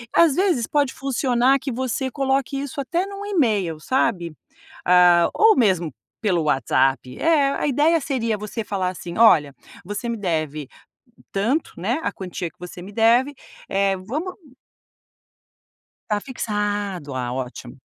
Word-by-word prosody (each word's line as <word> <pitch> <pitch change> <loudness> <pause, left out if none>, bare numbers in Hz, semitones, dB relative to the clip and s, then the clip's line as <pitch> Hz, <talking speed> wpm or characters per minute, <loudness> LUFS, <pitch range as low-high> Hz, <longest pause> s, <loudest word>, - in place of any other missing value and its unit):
Às 325 -5 +5
vezes 355 - +2
pode 285 -3 +1
funcionar 265 0 +2
que 270 - -4
você 260 +2 -2
coloque 270 0 0
isso 280 0 -6
até 335 +7 -1
num 400 0 -7
email, 215 - 0
sabe. 185 -10 0 0.5
Hã, 175 -1 +6
ou 440 0 +5
mesmo 180 - +2 0.3
pelo 180 -7 +1
WhatsApp, 135 -2 +1
eh, 295 -4 +3
a - - -1
ideia 305 +5 +3
seria 230 -6 -1
você 210 +2 -5
falar 190 -3 -2
assim: 175 0 -7
"Olha, 155 -11 +5 0.3
você 205 +4 -4
me 230 - -2
deve 155 -6 -2 0.6
tanto, 235 +11 0
né, 220 - -1
a - - -1
quantia 180 -2 -5
que - - -34
você 180 0 -9
me 195 - -9
deve, 235 +5 +3 0.4
eh 195 0 +1
vamos" 290 - -4 1.8
Tá 210 - +1
fixado, 205 - -3
ah, 125 -1 -2
ótimo. 125 0 -6
215 Hz, 140 wpm, -22 LUFS, 175-270 Hz, 1.8 s, Hã